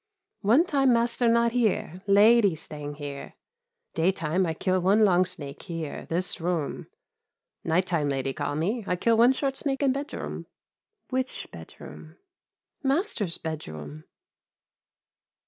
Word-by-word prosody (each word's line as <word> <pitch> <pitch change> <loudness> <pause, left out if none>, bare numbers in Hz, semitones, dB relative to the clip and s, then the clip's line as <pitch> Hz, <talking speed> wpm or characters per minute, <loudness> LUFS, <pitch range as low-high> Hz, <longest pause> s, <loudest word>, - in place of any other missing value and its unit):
"One 235 - +4
time 275 -6 +2
master 235 +1 +1
not 235 0 +3
here, 215 -7 0
lady 205 -1 +5
staying 145 -2 -7
here; 145 -2 -7 0.6
daytime 170 +1 +1
I 160 - -2
kill 185 +2 0
one 205 +4 +4
long 185 -2 +4
snake, 145 -7 -6
here, 165 -5 -6
this 175 +1 -1
room 165 -4 -2 0.8
night 170 +3 +1
time 165 -6 0
lady 135 -1 -1
call 145 0 -3
me, 205 +10 -1
I 180 - +1
kill 230 +6 +2
one 235 +3 +6
short 270 0 -2
snake 275 0 -2
in 270 - +4
bedroom." 280 +2 -5 0.6
"Which 260 0 -2
bedroom?" - - -11 0.7
"Master's 270 - -1
bedroom." 80 - -7
185 Hz, 130 wpm, -26 LUFS, 160-235 Hz, 0.8 s, one